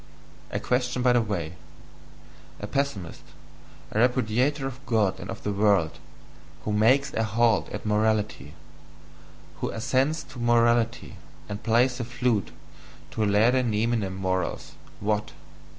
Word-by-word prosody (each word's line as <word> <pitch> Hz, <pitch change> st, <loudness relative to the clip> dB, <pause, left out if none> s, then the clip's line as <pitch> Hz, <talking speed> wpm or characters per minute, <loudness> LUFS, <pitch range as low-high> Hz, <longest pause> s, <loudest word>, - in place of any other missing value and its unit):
A -, -, -2 dB
question 125 Hz, 0 st, 0 dB
by 125 Hz, -1 st, +5 dB
the 120 Hz, -, +4 dB
way: 90 Hz, -7 st, -3 dB, 1.1 s
a -, -, -5 dB
pessimist, 135 Hz, -12 st, -3 dB, 0.7 s
a 110 Hz, -, 0 dB
repudiator 125 Hz, +3 st, +2 dB
of 135 Hz, 0 st, -6 dB
God 110 Hz, -5 st, +1 dB
and -, -, -8 dB
of -, -, -6 dB
the 105 Hz, -, -1 dB
world, 100 Hz, -5 st, +2 dB, 0.7 s
who 105 Hz, -, -1 dB
MAKES 130 Hz, +7 st, +3 dB
A 115 Hz, -, 0 dB
HALT 110 Hz, 0 st, +2 dB
at -, -, -7 dB
morality 105 Hz, -9 st, 0 dB, 1.0 s
who -, -, -2 dB
assents 135 Hz, +7 st, 0 dB
to 125 Hz, -, -12 dB
morality, 120 Hz, 0 st, +2 dB, 0.3 s
and 100 Hz, 0 st, -6 dB
plays 120 Hz, +3 st, +2 dB
the -, -, -1 dB
flute 120 Hz, -3 st, 0 dB, 0.6 s
to 110 Hz, -, -1 dB
laede 105 Hz, +4 st, +4 dB
neminem 110 Hz, -3 st, 0 dB
morals, 95 Hz, -1 st, -2 dB, 0.3 s
what? 105 Hz, 0 st, -1 dB
115 Hz, 130 wpm, -26 LUFS, 105-125 Hz, 1.1 s, by